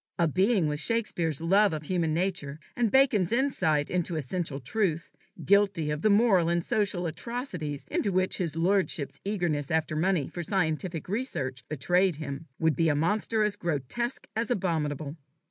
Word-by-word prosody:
A 170 - +3
being 185 +2 +2
with 150 0 -1
Shakespeare's 170 - 0
love 195 +3 +4
of 155 0 -4
human 165 0 0
nature, 160 -4 -2 0.2
and 240 -2 +2
Bacon's 220 -8 +3
insight 190 - +1
into 175 -1 -1
essential 155 0 -3
truth, 165 - -1 0.3
guilty 195 -6 +3
of 150 0 -3
the 215 - +3
moral 200 -5 +4
and 170 0 +1
social 200 -4 0
atrocities 170 - -4
into 200 - 0
which 185 0 +1
his 165 -5 -1
lordship's 175 -3 0
eagerness 175 -8 -1
after 160 -1 0
money 170 -2 +1
for 175 - -6
scientific 165 -2 -1
research 165 - -3
betrayed 175 +5 +2
him, 145 +1 -6
would 160 -3 +2
be 165 +3 +2
a 145 - +2
monster 210 +7 +1
as 210 -1 +1
grotesque 180 - -3
as 230 +3 -1
abominable. 160 - -1
175 Hz, 160 wpm, -28 LUFS, 155-200 Hz, 0.3 s, love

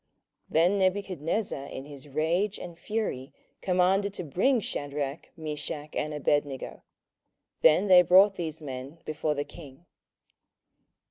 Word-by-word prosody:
27:003:013 - - -18
Then 175 +5 +4
Nebuchadnezzar 185 -4 -1
in 135 - -7
his 145 -1 -10
rage 165 +8 0
and 175 -1 -8
fury 205 - -3 0.3
commanded 190 +2 +2
to 180 - -4
bring 210 - +2
Shadrach, 145 -5 -4
Meshach, 150 -1 -5
and 150 - -1
Abednego. 145 -2 -1 0.8
Then 170 +6 +5
they 185 -2 +8
brought 190 +3 +6
these 160 -4 -5
men 135 +2 -7
before 155 0 -1
the 145 0 -2
king. 145 0 -13
160 Hz, 125 wpm, -28 LUFS, 145-185 Hz, 0.8 s, they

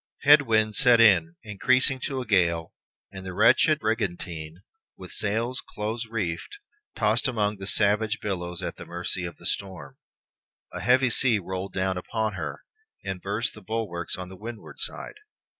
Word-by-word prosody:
Head 145 +1 +8
winds 110 -4 +1
set 125 -5 +6
in, 90 -7 +5
increasing 130 +5 +2
to 135 -2 -2
a - - -6
gale, 85 -6 +1 0.4
and 95 -1 -9
the 95 -1 -7
wretched - - +4
brigantine, 90 -6 -3 0.3
with 90 - -10
sails 110 +4 -1
close 110 +2 -3
reefed, 105 - -4 0.4
tossed 110 +1 +2
among 105 -4 -1
the 95 0 -6
savage 105 +2 +2
billows 90 -4 -4
at - - -4
the - - -9
mercy 90 +1 -3
of 85 - -7
the - - -14
storm. 90 -9 -4 0.8
A - - -5
heavy 125 0 +3
sea 120 -2 +4
rolled 95 0 -5
down 95 -1 -1
upon 110 +3 -2
her, - - -6 0.4
and 95 -2 -4
burst 100 +4 -2
the 110 - -12
bulwarks 95 -4 -3
on 90 0 -7
the 95 - -11
windward 110 +3 -9
side. - - -3
105 Hz, 160 wpm, -26 LUFS, 90-115 Hz, 0.8 s, Head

